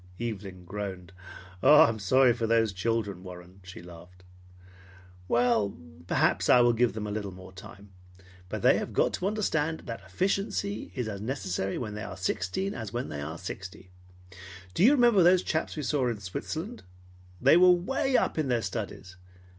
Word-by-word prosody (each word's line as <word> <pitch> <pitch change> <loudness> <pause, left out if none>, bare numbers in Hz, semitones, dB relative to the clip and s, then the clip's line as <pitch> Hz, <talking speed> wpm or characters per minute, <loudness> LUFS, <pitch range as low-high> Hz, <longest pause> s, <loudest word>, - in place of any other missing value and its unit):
Evelyn 100 -6 -6
groaned. 95 -2 -6 0.5
"I'm 115 -7 +6
sorry 125 +5 +4
for 115 -1 -2
those 115 -2 +2
children, 100 -1 -2
Warren," 90 0 -11
she 95 -2 -11
laughed. 90 +1 -14 1.0
"Well, 120 -3 +1 0.3
perhaps - - +1
I 125 - +7
will 120 0 +4
give 120 +1 +2
them 110 -1 -5
a 105 - -4
little 105 -1 -4
more 95 +1 -12
time, 95 +1 -13 0.6
but - - -5
they - - +5
have - - -6
got - - +2
to 185 - -2
understand 165 -7 -1
that 115 -3 -7
efficiency 195 - -2
is 125 -4 -2
as 100 -2 -5
necessary 95 -6 -3
when 110 -4 -5
they 105 - -6
are 95 - -7
sixteen 95 - -2
as 110 -4 -6
when 120 +3 -4
they 75 -1 -5
are 80 +3 -5
sixty. 95 0 -9 0.8
Do 175 - +1
you 255 +7 +7
remember 240 -7 +5
those 180 +1 +5
chaps 160 0 -2
we 150 - -4
saw 135 -2 0
in 115 -3 -2
Switzerland? 160 - -6 0.6
They 135 +5 +5
were 180 +1 +7
way 250 +9 +2
up - - 0
in 155 - 0
their 120 -3 0
studies. 95 -4 -6
110 Hz, 170 wpm, -28 LUFS, 95-150 Hz, 1.0 s, I